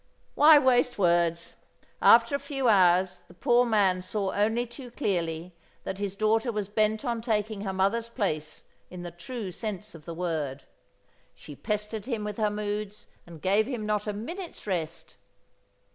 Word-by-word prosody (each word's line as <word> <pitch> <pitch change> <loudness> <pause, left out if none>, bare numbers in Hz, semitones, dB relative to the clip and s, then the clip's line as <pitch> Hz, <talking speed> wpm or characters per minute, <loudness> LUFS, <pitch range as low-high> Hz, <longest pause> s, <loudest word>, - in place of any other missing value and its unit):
Why 305 +1 +8
waste 250 -3 +3
words? 170 -2 +1 0.4
After 235 +3 +6
a - - -1
few 275 -2 -2
hours 185 -3 +4
the 175 - -17
poor 245 +2 +3
man 195 -5 +2
saw 195 +1 -2
only 225 +4 +1
too 245 +2 -10
clearly 175 - -2 0.3
that 190 - -5
his 200 -1 -3
daughter 220 +3 +1
was 210 -3 -3
bent 215 +3 0
on 235 -2 -1
taking 215 -3 -1
her 195 -2 -3
mother's 200 +5 0
place 155 -10 -3 0.3
in 180 -1 -8
the 175 - -6
true 200 +3 -6
sense 210 +1 -5
of 160 -2 -13
the 170 - -6
word. 155 -6 -3 0.7
She 145 - -11
pestered 210 - -3
him 230 -5 -2
with 210 -1 -5
her 215 -2 +2
moods 210 0 -4 0.2
and 165 -3 -12
gave 205 +4 +3
him 240 -5 -4
not 210 0 -1
a - - 0
minute's 335 - -7
rest. 170 -4 -4
210 Hz, 165 wpm, -27 LUFS, 180-230 Hz, 0.7 s, Why